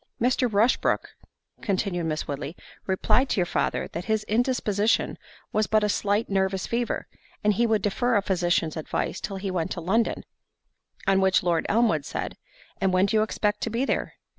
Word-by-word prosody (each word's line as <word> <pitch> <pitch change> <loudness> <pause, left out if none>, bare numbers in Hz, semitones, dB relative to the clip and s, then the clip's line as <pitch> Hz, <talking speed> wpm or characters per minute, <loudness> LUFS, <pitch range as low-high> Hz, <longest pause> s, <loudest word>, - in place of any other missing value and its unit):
"Mr. 250 0 +2
Rushbrook," 220 +5 +2 0.5
continued 190 -5 -1
Miss 155 -1 -2
Woodley, 145 +3 -4 0.3
"replied 225 +7 +2
to - - +1
your 180 - +3
father, - - -1
that 170 +2 -5
his 220 -1 0
indisposition 220 -2 +1 0.4
was 215 0 +2
but 215 -1 +3
a 210 - +2
slight 205 +2 +1
nervous 190 -1 0
fever, 235 0 -1 0.4
and 210 0 +4
he 235 +4 +2
would 220 -2 +1
defer 240 +4 +1
a 205 - +3
physician's 175 -4 +1
advice 160 - -3
till 195 -2 -4
he 190 0 -3
went 170 -3 -1
to - - -5
London"—on 195 0 -2
which 190 -1 +3
Lord 170 -2 +1
Elmwood 215 -10 +3
said, - - -4 0.4
"And 190 - +1
when 185 +1 +4
do 200 - 0
you - - +4
expect 210 -1 0
to - - -1
be 235 +4 0
there?" - - -1
205 Hz, 175 wpm, -26 LUFS, 185-225 Hz, 0.5 s, and